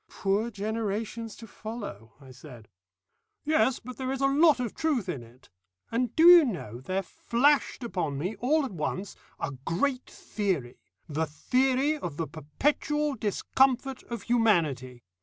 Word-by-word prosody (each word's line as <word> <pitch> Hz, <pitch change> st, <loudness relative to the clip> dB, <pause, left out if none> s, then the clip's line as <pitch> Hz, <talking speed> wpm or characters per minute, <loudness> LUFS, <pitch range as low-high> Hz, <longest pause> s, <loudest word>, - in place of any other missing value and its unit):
"Poor 205 Hz, +4 st, 0 dB
generations 220 Hz, +1 st, -3 dB
to 230 Hz, -, -11 dB
follow!" 205 Hz, -, -8 dB
I 135 Hz, -2 st, -14 dB
said. 125 Hz, -4 st, -13 dB, 0.8 s
"Yes, 300 Hz, -4 st, +3 dB
but 250 Hz, +2 st, -10 dB
there 260 Hz, -1 st, -3 dB
is 270 Hz, -, -2 dB
a -, -, +4 dB
lot 290 Hz, +1 st, +5 dB
of 240 Hz, -4 st, -2 dB
truth 285 Hz, -, 0 dB
in 155 Hz, -9 st, -3 dB
it; 120 Hz, +1 st, -18 dB, 0.4 s
and 240 Hz, 0 st, -1 dB
do 320 Hz, -, +5 dB
you 350 Hz, -1 st, +10 dB
know 165 Hz, -, -4 dB
there 185 Hz, +7 st, -2 dB
flashed 265 Hz, -, +1 dB
upon 170 Hz, -11 st, -2 dB
me 180 Hz, +9 st, -3 dB
all 295 Hz, +4 st, +2 dB
at 260 Hz, -, -6 dB
once 185 Hz, +3 st, -4 dB, 0.2 s
a 160 Hz, -, -2 dB
great 255 Hz, -, -1 dB
theory, 175 Hz, -, -3 dB, 0.3 s
the 160 Hz, 0 st, -1 dB
Theory 260 Hz, -, +1 dB
of 165 Hz, -, -5 dB
the 165 Hz, -, -1 dB
Perpetual 295 Hz, -, -1 dB
Discomfort 260 Hz, +4 st, +1 dB
of 235 Hz, -3 st, -6 dB
Humanity. 155 Hz, -, +1 dB
220 Hz, 150 wpm, -28 LUFS, 160-265 Hz, 0.8 s, you